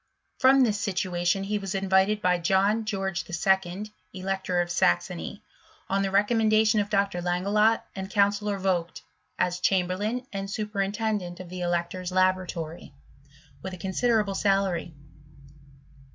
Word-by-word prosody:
From 265 0 +6
this 210 -4 0
situa 180 -3 -2
tion 195 +2 +2
he 210 +1 -1
was 195 -1 -4
invited, 195 +2 +2
by 180 -1 +3
John 195 +5 +2
George 195 -3 -2
11., 190 +3 0 0.2
Elector 190 -1 -2
of 175 0 -1
Saxony, 85 - 0 0.5
on 195 0 +2
the 195 - 0
recommendation 215 +1 +3
of 205 0 -1
Dr. 200 -3 0
Langelott 200 +6 +2
and 190 -1 -5
Counsellor 205 0 +1
Vogt, 180 -3 -1 0.3
as 180 0 0
chamberlain 195 +7 0
and 195 0 -4
superintendent 205 -2 -2
of 185 -2 -9
the 180 0 -6
elector's 175 +1 -2
laboratory, 185 - -1 0.7
with 190 0 -6
a - - -12
considerable 205 +2 +1
salary. 195 -5 0
195 Hz, 130 wpm, -26 LUFS, 180-210 Hz, 0.7 s, From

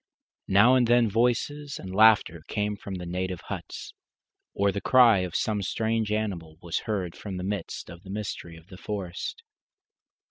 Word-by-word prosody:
Now 100 +6 +6
and 125 -2 +4
then 120 -2 +4
voices 140 +6 0
and 95 0 -8
laughter 105 -6 +5
came 105 0 -1
from 100 -1 -7
the 90 -1 -6
native 90 0 -3
huts, - - -7 0.6
or 100 0 +1
the 100 - -4
cry 120 -6 +6
of 90 -3 -3
some 105 -2 0
strange 110 +2 -1
animal 90 -8 -3
was 85 -1 -2
heard 95 -5 -2
from 95 -3 -6
the 90 - -4
midst 100 -2 -4
of 85 0 -11
the 95 - -14
mystery 95 -5 -5
of 80 - -16
the 95 - -11
forest. 100 - -5
100 Hz, 170 wpm, -27 LUFS, 90-110 Hz, 0.6 s, Now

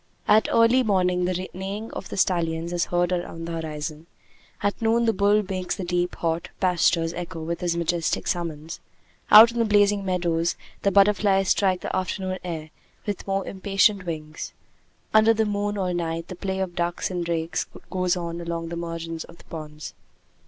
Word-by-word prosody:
At 215 - +5
early 230 +3 +5
morning 180 -5 +2
the 185 +1 -2
neighing 195 +4 -5
of 190 - -7
the - - -6
stallions 170 -2 0
is 175 - +1
heard 175 0 0
around 175 -2 -3
the 170 - -5
horizon; 155 +1 -6 0.6
at 205 +3 0
noon 230 +1 +3
the 225 - +3
bull 205 +2 +3
makes 185 -2 -2
the 195 - -5
deep, 175 0 -1
hot 165 0 -2
pastures 170 -2 +2
echo 170 -2 -6
with 170 +1 -3
his 170 -1 0
majestic 170 -1 0
summons; 165 -2 -3 0.5
out 225 +2 +10
in 235 - -4
the - - +4
blazing 205 -1 +3
meadows 175 -3 0 0.3
the 200 - +3
butterflies 200 -1 +4
strike 190 -3 +2
the - - -3
afternoon 185 0 -2
air 160 -3 -5 0.3
with 205 -2 -4
more 195 0 0
impatient 195 0 +1
wings; 155 -2 -5 0.6
under 215 +1 +6
the 220 0 +2
moon 205 0 -1
all 185 -2 -1
night 165 -1 -3
the 185 - -6
play 190 +1 -3
of 185 -2 -3
ducks 175 +2 -1
and 180 -1 -2
drakes 165 -1 -2 0.2
goes 185 -1 +1
on 170 -1 -4
along 170 -1 -4
the 170 - -4
margins 165 -1 -5
of 170 - -15
the - - -17
ponds. 150 -1 -7
180 Hz, 180 wpm, -25 LUFS, 170-200 Hz, 0.6 s, out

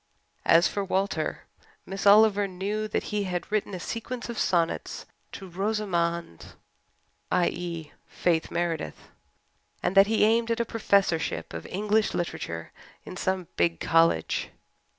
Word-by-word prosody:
As 165 +2 +6
for 200 - -2
Walter, 195 +1 -1 0.4
Miss 195 +1 -3
Oliver 205 -1 +6
knew 200 +3 -3
that 210 - -1
he 205 -1 0
had 180 0 -4
written 210 -2 -1
a - - -5
sequence 240 +6 -5
of 235 - -4
sonnets 170 -2 0 0.3
"to 195 - -8
Rosamond" 175 - -2 0.8
i.e., 170 -3 -1 0.2
Faith 165 -2 0
Meredith 170 -2 -3 0.7
and - - +1
that 195 0 +7
he 220 0 +2
aimed 230 +1 +2
at 230 0 0
a 235 - +1
Professorship 200 -7 0
of - - -6
English 210 +2 +1
literature 85 - -4 0.3
in - - -8
some 185 -1 -1
big 85 -1 +2
college. 165 0 +2
190 Hz, 130 wpm, -27 LUFS, 170-210 Hz, 0.8 s, that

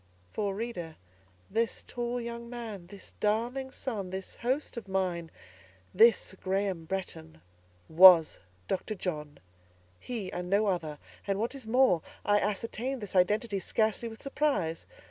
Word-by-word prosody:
For, 200 -2 -1
reader, 190 -8 -5 0.5
this 230 +2 -1
tall 240 0 -3
young 235 0 -6
man—this 205 -6 -8
darling 240 +5 0
son—this 195 -8 -5
host 260 +5 -1
of 230 -4 -7
mine—this 170 - 0
Graham 190 -3 -1
Bretton, 120 - -5 0.5
was 170 -1 +8 0.3
Dr. 195 +3 -2
John: 150 -6 -4 0.6
he, 220 -7 -5
and 180 0 -4
no 200 +3 +3
other; 165 -6 -1 0.3
and, 195 0 0
what 230 +4 -1
is 265 -5 -10
more, 245 -8 +4 0.2
I 205 0 +4
ascertained 230 +6 -2
this 205 -3 -7
identity 205 +3 +2
scarcely 220 +4 0
with 220 - -11
surprise. 275 - -1
200 Hz, 125 wpm, -30 LUFS, 180-235 Hz, 0.6 s, was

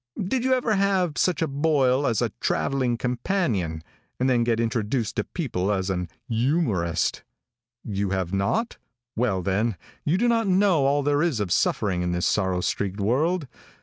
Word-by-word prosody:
Did 235 +6 -1
you 260 0 +3
ever 245 -3 0
have 195 -5 +1
such 170 -2 +1
a - - 0
boil 140 -2 +2
as 115 -3 +1
a - - 0
traveling 130 -4 0
companion, 120 - -1 0.4
and 130 - +2
then 125 -2 +3
get 115 -1 +1
introduced 115 0 -1
to - - +1
people 105 - -2
as 95 -1 -1
an 90 -1 -3 0.2
youmorist? 115 - 0 0.6
You 100 -2 -2
have 95 -1 -2
not? 100 - 0 0.4
Well, 110 -6 0
then, 100 +3 0 0.3
you 160 +5 +1
do 240 +5 +2
not 230 -2 +2
know 185 -7 +3
all 145 +1 +2
there 145 +1 +2
is 160 -9 +1
of 100 -4 -2
suffering 95 -1 +1
in 90 0 -1
this 90 0 0
sorrow 95 -3 +1
streaked 100 +2 -2
world. 145 - +1
125 Hz, 170 wpm, -25 LUFS, 100-165 Hz, 0.6 s, you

